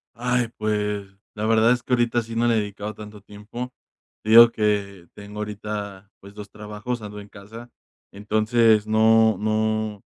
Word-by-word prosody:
Ay, 125 0 -1
pues, 105 -1 -2 0.3
la 105 0 -3
verdad 110 +1 +3
es 125 -1 -2
que 125 - -7
ahorita 120 -1 +2
sí 115 0 -9
no 115 +1 +1
le 120 - +2
he - - +2
dedicado 105 +1 -6
tanto 105 0 -11
tiempo. 105 +5 -9 0.5
Te 110 - -3
digo 115 +1 +9
que 100 -5 -2
tengo 105 0 -11
ahorita, 105 -1 -6
pues, 100 +1 -14
2 105 -1 -10
trabajos, 105 +3 -6
ando 105 -1 -9
en 100 - -13
casa. 110 +4 -12 0.4
Entonces, 110 +1 +2
no 110 0 +4
no 110 -1 -1
105 Hz, 165 wpm, -23 LUFS, 105-115 Hz, 0.5 s, digo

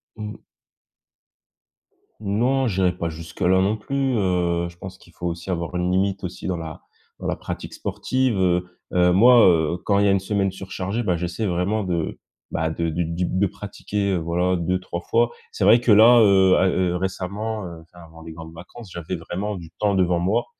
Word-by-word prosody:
Mmh. 105 -1 -8 1.8
Non, 120 +6 +1
j'irai 95 -3 +1
pas 85 -2 -3
jusque 80 +1 -10
là 95 +1 +4
non 100 +3 +1
plus, 135 +4 -1
heu. 90 -3 0
Je 85 - -16
pense 95 +1 -9
qu'il 85 - -20
faut 90 - -8
aussi 85 +2 -5
avoir 85 0 -3
une 90 0 0
limite 95 +1 0
aussi 90 0 -6
dans 90 -2 -1
la 80 -2 -7 0.4
dans - - -5
la - - 0
pratique - - -7
sportive, 130 -4 -1
heu. 90 -1 +2 0.3
Heu, 90 0 +4
moi, 120 +7 +7
heu, 85 -1 +2
quand 100 -1 +3
il 100 - +3
y - - +4
a - - +4
une 95 - +3
semaine 95 0 -1
surchargée, 95 +4 -4
bah, 90 -4 +1
j'essaie 90 +5 -3
vraiment 95 +4 0
de, 85 -4 -3 0.3
bah, 80 0 -1
de 85 +1 -2
du 85 +2 -1
du 85 +2 -2
p - - -4
de 95 +2 +2
pratiquer, 100 0 -4
heu, 90 - +1
voilà 85 +2 0
2-3 90 0 -2
fois. 120 +4 +1 0.2
C'est - - -3
vrai 110 +5 +7
que 120 - +2
là, 115 +4 +8
heu, 95 -3 +5
à, 95 - +3
heu 90 -1 0
récemment, 100 +3 -3
heu, 85 -2 -9
enfin 85 +1 -16
avant 80 0 -15
les 80 - -9
grandes 80 0 -10
vacances, 90 +5 -12
j'avais 85 +2 -4
vraiment 95 +5 -4
du 85 -3 -10
temps 105 -2 +1
devant 90 -2 +2
moi 100 +7 +1
95 Hz, 205 wpm, -23 LUFS, 85-100 Hz, 1.8 s, là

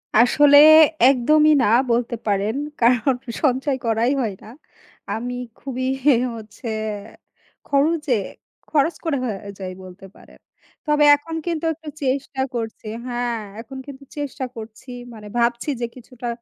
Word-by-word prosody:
আসলে 285 +5 +6 0.5
একদমই 305 +4 +4
না - - +3 0.2
বলতে 235 0 0
পারেন, 205 +2 0 0.3
কারণ 245 +2 +3 0.3
সঞ্চয় 265 0 +1
করাই 230 +2 +1
হয় 220 -5 -2
না। - - -13 0.7
আমি 245 +2 -4 0.2
খুবই 255 -1 -4 0.5
হচ্ছে 220 +2 -10 1.0
খরচে, 295 0 +1 0.6
খরচ 315 +2 +2
করা 320 -5 0
হয়ে 215 -5 -3 0.2
যাই 185 -1 -5
বলতে 185 +1 -12
পারেন। - - -18 0.5
তবে 300 0 +3
এখন 325 +3 -7
কিন্তু 335 -2 -2
একটু 315 0 -10
চেষ্টা 265 0 -1
করছি, 225 -2 -5 0.2
হ্যাঁ, 240 -1 -2 0.2
এখন 255 +3 -10
কিন্তু 275 -1 -11
চেষ্টা 290 -2 -4
করছি 225 +3 -10 0.2
মানে 215 -2 -11
ভাবছি 235 +4 0
যে, - - +1
কিছুটা 245 -1 -9
255 Hz, 130 wpm, -21 LUFS, 230-285 Hz, 1.0 s, আসলে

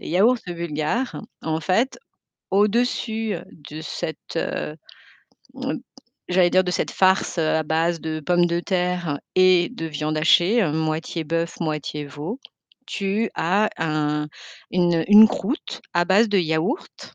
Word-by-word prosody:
Les - - -8
yaourts 215 +9 +4
bulgares, 170 - -2 0.2
en 160 0 -1
fait, 205 - 0 0.5
au-dessus 220 +1 +1 0.4
de 155 +1 -7
cette, 160 +1 -6
heu, 150 -1 -3 0.9
m - - -2 0.5
j'allais 180 -1 +3
dire 185 +1 +4
de 180 - -1
cette - - -1
farce, 190 -1 +2
heu, 160 -1 +2
à 160 - +2
base 165 +2 0
de 155 -1 -4
pommes 175 +3 +2
de 170 0 0
terre 180 -5 -1 0.2
et 185 -1 +5
de 245 -10 -6
viande 155 0 -3
hachée, 175 +8 +4
heu, 155 - 0
moitié 160 +1 -2
bœuf, 165 +2 -2
moitié 150 -2 -3
veau, 155 - -6 0.5
tu 205 +2 -1
as 200 +6 +2
un 150 -1 -1 0.4
une, 175 -1 +2
heu, 165 - +1
une 215 +1 +9
croûte 240 - -4
à 175 0 +3
base 205 +4 +4
de 205 - +3
yaourt. 170 - -2
175 Hz, 145 wpm, -23 LUFS, 160-195 Hz, 0.9 s, une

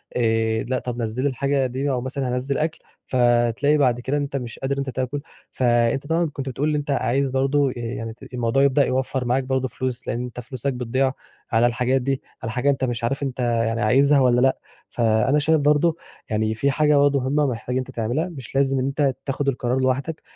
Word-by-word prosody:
آآ، 110 -1 +1
لأ 130 +1 -1
طَب 125 -1 -4
نزِّل 115 +3 -2
لي 145 - +3
الحاجة 135 +1 0
دي 130 +3 -2
أو 125 -2 -1
مثلًا 130 +1 -3
هانزّل 135 +2 -1
أكل 155 +1 -1 0.3
فتلاقي 120 +3 +3
بعد 125 -4 +2
كده 135 +4 -1
إن 145 - 0
أنت 140 -1 -4
مش 120 -4 -5
قادر 135 +1 -1
إن - - -4
أنت 140 -1 -2
تاكل، 130 +2 -2 0.3
فأنت 120 +2 +1
طبعًا 165 +2 +2
كنت 135 -1 -4
بتقول 145 +4 -1
إن 150 - 0
أنت 145 -1 -2
عايز 135 0 +1
برضه 135 +1 +2
آآ، - - -5
يعني 115 -1 -5 0.2
الموضوع 120 +2 +1
يبدأ 140 0 +4
يوفّر 130 0 -1
معاك 125 +2 +1
برضه 130 0 -1
فلوس 130 -1 -4
لإن 120 - -1
أنت 125 0 -7
فلوسك 130 +1 -3
بتضيع 130 +2 0 0.4
على 115 +1 +4
الحاجات 125 +2 +1
دي، 135 +1 -1 0.2
على 115 - -3
حاجة 125 +3 +1
أنت 135 -1 0
مش 120 -2 -2
عارف 135 +4 -1
أنت 130 -2 -4
يعني 115 -1 0
عايزها 140 +6 +4
والَّا 125 -2 +4
لأ، 130 +1 +3 0.3
فأنا 115 +5 +2
شايف 155 +1 +3
برضه 150 +3 +3 0.3
يعني 110 0 0
في 140 +5 +1
حاجة 150 0 +3
برضه 140 0 +4
مهمة 140 +3 +1
محتاج 120 0 -3
إن - - +2
أنت - - -11
تعملها، 125 +9 -1
مش 135 -7 -10
لازم 135 -1 +2
إن 130 - 0
أنت 140 -1 0
تاخد 140 0 -2
القرار 125 -1 0
لوحدك، 130 +4 -1
130 Hz, 215 wpm, -23 LUFS, 120-140 Hz, 0.4 s, يبدأ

